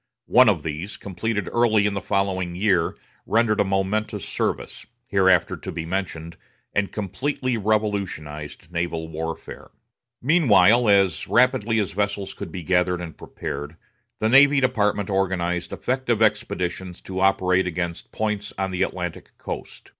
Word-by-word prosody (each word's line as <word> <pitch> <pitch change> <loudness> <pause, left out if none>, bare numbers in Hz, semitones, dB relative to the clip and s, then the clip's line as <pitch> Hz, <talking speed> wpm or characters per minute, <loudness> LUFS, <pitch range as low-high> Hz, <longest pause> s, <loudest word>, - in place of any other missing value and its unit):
One - - +6
of - - 0
these, 85 +7 -5
completed 105 +1 -3
early 110 -3 +3
in 105 - +1
the 100 - -3
following 95 -3 -1
year, 95 -3 +1 0.3
rendered 115 -1 +2
a - - +5
momentous 100 +1 -1
service, - - -3 0.2
hereafter 95 -2 +3
to - - -7
be 80 - -5
mentioned, 85 -2 -4 0.4
and 100 -1 0
completely 130 +5 -2
revolutionized 100 -9 -2
naval 85 -1 -2
warfare. 80 +1 -6 0.5
Meanwhile, 120 - +5
as 100 -4 +3
rapidly 120 -3 +3
as 105 -5 0
vessels 100 +1 -2
could - - -7
be 90 -3 -6
gathered 90 +1 +1
and 85 -2 -7
prepared, 75 +3 -6 0.4
the 110 - +1
Navy 140 +4 +6
Department 105 -6 +1
organized 90 -3 -1
effective 125 -3 -1
expeditions 95 -4 -1
to 95 -1 -5
operate 95 -1 +3
against 85 0 -4
points 105 -1 -2
on 95 0 -1
the 90 0 -3
Atlantic 90 -3 -4
coast. - - -8
95 Hz, 140 wpm, -23 LUFS, 90-110 Hz, 0.5 s, One